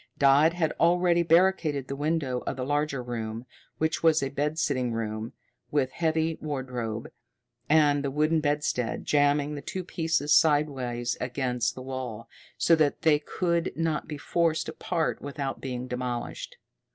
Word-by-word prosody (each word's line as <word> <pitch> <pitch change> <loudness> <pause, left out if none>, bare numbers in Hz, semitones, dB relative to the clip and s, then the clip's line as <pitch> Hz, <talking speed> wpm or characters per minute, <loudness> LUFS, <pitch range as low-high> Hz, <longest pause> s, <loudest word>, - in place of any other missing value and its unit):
Dodd 140 +4 +5
had 165 -3 0
already 175 0 +4
barricaded 165 -5 +2
the 140 - -4
window 145 -3 -1
of - - -1
the 125 - -3
larger 145 -2 -1
room, 115 -1 -5 0.3
which 160 0 0
was 160 -3 +4
a 135 - -1
bed 150 +3 -2
sitting 130 -6 0
room, 110 0 -4 0.4
with 135 -3 +1
a - - -25
heavy 160 -1 0
wardrobe, 125 -7 -4 0.6
and 145 -2 +4
the 140 - -1
wooden 155 +3 +2
bedstead, 145 -5 -1
jamming 145 0 +2
the 145 - -5
two 185 +6 -5
pieces 160 -4 0
sidewise 135 -6 +2
against 125 -1 -1
the 130 - -8
wall, 125 -4 -5 0.3
so 165 - +4
that 150 -2 +1
they 155 -2 +5
could 170 +2 -1
not 160 -1 -1
be 150 - -5
forced 165 +1 0
apart 165 -3 -2
without 140 -1 -4
being 125 -1 -4
demolished. 125 -1 -4
145 Hz, 150 wpm, -27 LUFS, 125-160 Hz, 0.6 s, Dodd